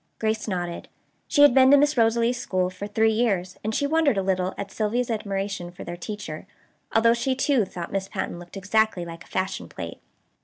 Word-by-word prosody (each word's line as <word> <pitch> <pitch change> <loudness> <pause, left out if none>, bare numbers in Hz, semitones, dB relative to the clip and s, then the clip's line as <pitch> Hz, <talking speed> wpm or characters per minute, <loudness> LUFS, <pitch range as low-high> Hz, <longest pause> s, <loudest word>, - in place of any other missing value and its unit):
Grace 220 0 -1
nodded. 175 -3 -3 0.4
She 290 -3 +4
had 290 - +8
been 260 0 +6
to 285 - +8
Miss 295 +1 +3
Rosalie's 235 +1 +2
school 185 -1 0
for 185 +2 -6
three 220 +1 +2
years, 195 -6 0
and 220 +1 -2
she 285 - +1
wondered 300 -5 +2
a 195 - +1
little 185 -1 0
at 200 0 -5
Sylvia's 230 +4 -1
admiration 195 -4 -3
for 175 - -10
their 175 - -6
teacher, 175 -3 -7 0.4
although 230 +1 +4
she 260 +3 0
too 265 -4 +2
thought 175 -2 -7
Miss 195 -1 -2
Patten 175 - -4
looked 175 +3 -11
exactly 200 -1 +1
like 165 0 -9
a - - -20
fashion 185 - -3
plate. 85 -2 -7
205 Hz, 200 wpm, -25 LUFS, 185-235 Hz, 0.4 s, had